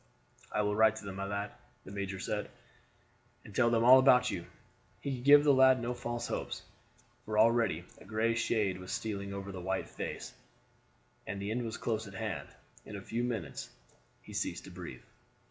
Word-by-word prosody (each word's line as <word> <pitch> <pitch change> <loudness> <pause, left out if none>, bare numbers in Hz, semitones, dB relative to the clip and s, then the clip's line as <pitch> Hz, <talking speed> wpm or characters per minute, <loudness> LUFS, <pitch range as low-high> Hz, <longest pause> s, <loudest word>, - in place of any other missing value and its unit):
"I 105 - +1
will 105 0 0
write 110 0 +5
to 110 - -8
them, 95 -1 -6
my 100 - -2
lad," 100 +1 -3 0.3
the - - -9
major 100 -1 -4
said, 105 +2 -3 1.0
"and 105 - -11
tell 120 -2 +4
them 115 -1 +3
all 130 +2 +9
about 130 -1 +5
you." 85 -3 -5 0.5
He 140 - -3
could 125 - -8
give 145 +1 +8
the 145 -1 +6
lad 130 -1 +6
no 120 +1 -2
false 120 -1 -4
hopes, - - -4 0.6
for 105 0 -3
already 110 -6 +4 0.2
a - - -14
gray 110 +3 +1
shade 105 -5 0
was 90 - -7
stealing 100 -3 -3
over 100 0 -5
the 95 -2 -6
white 95 +1 -2
face, - - -5 0.9
and 100 - -4
the 100 +2 -3
end 120 +2 -1
was 115 0 -4
close 110 -2 -2
at 100 - -10
hand; - - -3 0.4
in 105 - -9
a 100 - -6
few 115 +4 -2
minutes 115 -8 -3 0.5
he - - -11
ceased - - -2
to - - -10
breathe. - - -8
110 Hz, 195 wpm, -32 LUFS, 100-120 Hz, 1.0 s, all